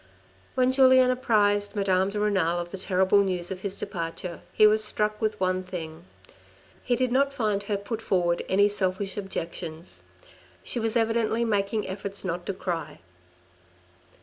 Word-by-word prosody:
When 255 0 +3
Julien 260 -1 +6
apprised 205 -5 +1
Madame 190 -1 +2
de 205 +1 -3
Renal 190 -5 +1
of 175 0 -6
the 195 - -5
terrible 190 +1 +3
news 180 -2 -2
of 185 - -4
his 195 0 -2
departure, 170 0 -5
he 215 - +5
was 215 0 +5
struck 210 0 -1
with 215 -1 -1
one 185 0 +1
thing. 170 -2 -7 0.8
He 245 - +1
did 255 0 0
not 275 +2 +2
find 215 -6 -1
her 205 0 -1
put 215 +3 -5
forward 175 -4 +1
any 200 +2 +4
selfish 195 -1 -1
objections. 170 -4 -6 0.6
She 240 - -2
was 225 +1 +1
evidently 225 0 +1
making 205 -1 0
efforts 195 +1 -5
not 175 0 -3
to 200 - -1
cry. 175 - -4
200 Hz, 155 wpm, -26 LUFS, 185-220 Hz, 0.8 s, Julien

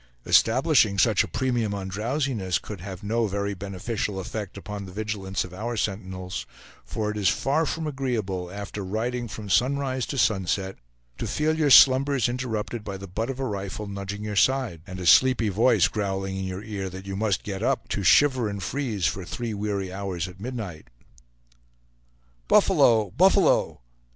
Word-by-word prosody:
Establishing 120 -4 +4
such 110 0 +4
a - - -5
premium 120 -5 -1
on 95 -1 -5
drowsiness 110 - -1
could 100 -5 -8
have 95 0 -8
no 115 +2 0
very 100 +1 -2
beneficial 100 +2 -4
effect 100 +1 -6
upon 100 0 -6
the - - -9
vigilance 100 -2 -3
of 90 - -10
our 115 +5 -4
sentinels; 95 -2 -4 0.4
for 105 - -3
it 105 - -6
is 100 -2 +3
far 145 +10 +1
from 160 +2 -3
agreeable, 115 -11 -2
after 100 +1 -6
riding 120 +5 -2
from 105 0 -8
sunrise 130 +4 +1
to 140 - -4
sunset, 95 -4 0 0.4
to - - -2
feel 155 +1 0
your 155 -2 +2
slumbers 135 -1 +6
interrupted 120 -3 -3
by 100 -2 -5
the 95 - -8
butt 110 +7 -3
of 135 -1 -4
a 135 - -1
rifle 100 -1 -4
nudging 100 +1 -5
your 105 -1 -4
side, 125 -7 +2
and 95 0 -7
a 90 - -5
sleepy 120 +3 +5
voice 105 -1 +4
growling 95 -1 -3
in 95 0 -3
your 95 +2 -5
ear 100 -3 -4
that 95 +1 -9
you 95 0 -5
must 105 -1 0
get 100 -1 -5
up, 130 +3 0
to 100 - -2
shiver 130 +3 +4
and 100 -2 -5
freeze 115 -6 -2
for 90 +3 -1
three 115 +5 -4
weary 100 -2 -3
hours 95 -3 -3
at 90 +1 -12
midnight. 105 - -6 1.6
"Buffalo! 110 -5 +4
buffalo!" 190 - +3
105 Hz, 170 wpm, -25 LUFS, 95-120 Hz, 1.6 s, slumbers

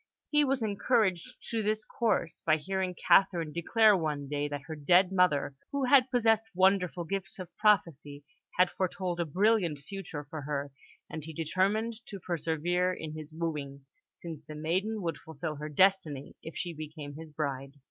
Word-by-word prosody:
He 295 -1 +5
was 270 -3 0
encouraged 200 -4 +1 0.2
to 225 -1 0
this 215 0 0
course 210 -7 -1
by 155 -1 +3
hearing 185 +3 -2
Catherine 170 -6 +3
declare 215 +5 +4
one 150 -5 -2
day 145 +1 -1
that 145 -1 -5
her 160 - -6
dead 175 +5 +4
mother, 165 -7 +2 0.2
who 280 -1 -1
had 260 0 +5
possessed 225 -3 +3
wonderful 185 -3 +3
gifts 190 +1 -4
of 185 -2 -9
prophecy, 155 -9 +1 0.3
had 180 0 +4
foretold 185 -1 -2
a 170 - +1
brilliant 185 -1 +2
future 150 0 -7
for 155 +1 -6
her; 140 0 -3 0.4
and 155 - -6
he 160 +1 -7
determined 205 +8 0
to 200 - -7
persevere 175 +1 0
in 160 -4 -6
his 155 0 -8
wooing, 150 -4 -4 0.3
since 165 -3 -8
the 155 - -9
maiden 190 +7 -1
would 165 -4 -2
fulfil 155 0 -6
her 150 +1 -5
destiny 155 -4 +2
if 160 - -8
she 175 -1 -3
became 155 -2 -8
his 160 +2 -9
bride. 140 -2 -3
170 Hz, 170 wpm, -30 LUFS, 150-195 Hz, 0.4 s, He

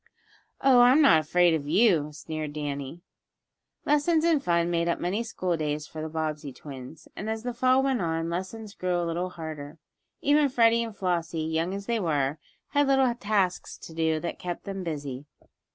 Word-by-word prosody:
"Oh, 265 -2 +6
I'm 250 +4 +6
not 275 - +6
afraid 175 +3 +3
of 145 -3 -2
you," 170 -4 +3
sneered 155 0 -6
Danny. 145 +2 -5 0.8
Lessons 310 +3 +2
and 320 -5 +3
fun 170 0 +1
made 170 0 +1
up 170 - 0
many 190 +6 -1
school 185 -6 -2
days 150 -1 -2
for 155 +1 -8
the 160 - -4
Bobbsey 155 -2 -3
twins. 135 +2 -10
And, 210 - -5
as 220 0 -3
the 245 0 -3
Fall 255 +2 +3
went 265 -5 +1
on, 165 -1 -1
lessons 190 +5 -5
grew 180 -3 -1
a 175 - -1
little 170 +2 -2
harder. 155 -3 -8 0.4
Even 290 0 +3
Freddie 230 -2 +4
and 225 -3 -7
Flossie, 170 -3 -1
young 160 +2 -1
as 200 0 -6
they 235 0 0
were, 150 -5 0 0.3
had 285 0 +2
little 270 -2 +3
tasks 205 -5 -1
to 165 - -11
do 160 -1 +1
that 175 - -4
kept 175 -1 -5
them 195 -1 -5
busy. 145 -4 -5
175 Hz, 185 wpm, -27 LUFS, 155-230 Hz, 0.8 s, Oh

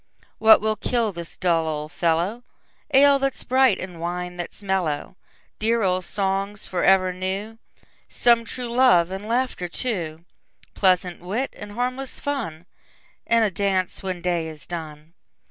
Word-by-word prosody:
What 220 0 +7
will 215 0 0
kill 230 0 0
this 170 -1 -7
dull 165 -3 +1
old 150 0 -4
fellow? 175 +7 0 0.5
Ale 280 0 +6
that 275 0 0
's - - -4
bright, 260 -5 +4
and 180 -3 -8
wine 180 +1 -4
that 175 - -5
's - - -12
mellow! 185 -6 -1 0.4
Dear 225 +1 +1
old 185 -1 +1
songs 195 +1 -1
for 180 -2 -2
ever 185 -1 +4
new; 195 +5 -4 0.5
Some 235 -1 +3
true 245 +1 -5
love, 240 -9 +5
and 195 +2 -6
laughter 240 -6 -1
too; 170 -6 -3 0.5
Pleasant 185 -2 +2
wit, 215 +10 -3
and 205 0 -9
harmless 255 +3 -2
fun, 175 - -4 0.6
And 230 -1 +4
a 205 - 0
dance 190 -1 -1
when 185 -2 -4
day 175 -2 0
is 155 -2 -10
done. 160 -2 -8
190 Hz, 155 wpm, -23 LUFS, 175-230 Hz, 0.6 s, What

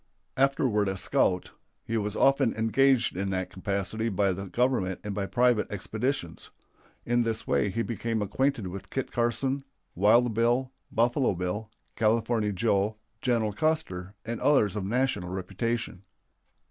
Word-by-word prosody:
Afterward 130 -6 +2
a 95 - -3
scout, 90 0 +1 0.3
he 115 - -2
was 105 -1 -1
often 135 -3 +3
engaged 125 +2 +3
in 95 +1 -2
that 95 -1 -2
capacity 100 +4 -2
by 100 -1 +1
the 95 +2 -6
Government 110 -5 0
and 105 -1 -4
by 100 -1 -2
private 120 -2 +2
expeditions. 110 - -3 0.6
In 120 0 +2
this 115 -1 -1
way 105 - +1
he 115 +5 -1
became 115 -1 -2
acquainted 120 +2 0
with 90 +1 -7
Kit 135 - -3
Carson, 120 +4 0 0.3
Wild 110 +5 +4
Bill, 120 +4 +1 0.2
Buffalo 120 0 +2
Bill, 90 +5 -3 0.3
California 110 0 +1
Joe, 100 +1 +1 0.3
General 115 -4 +1
Custer, 100 - -1
and 115 0 -4
others 110 -9 +3
of 105 - -2
national 120 -4 0
reputation. 100 +3 -3
110 Hz, 140 wpm, -28 LUFS, 100-120 Hz, 0.6 s, Wild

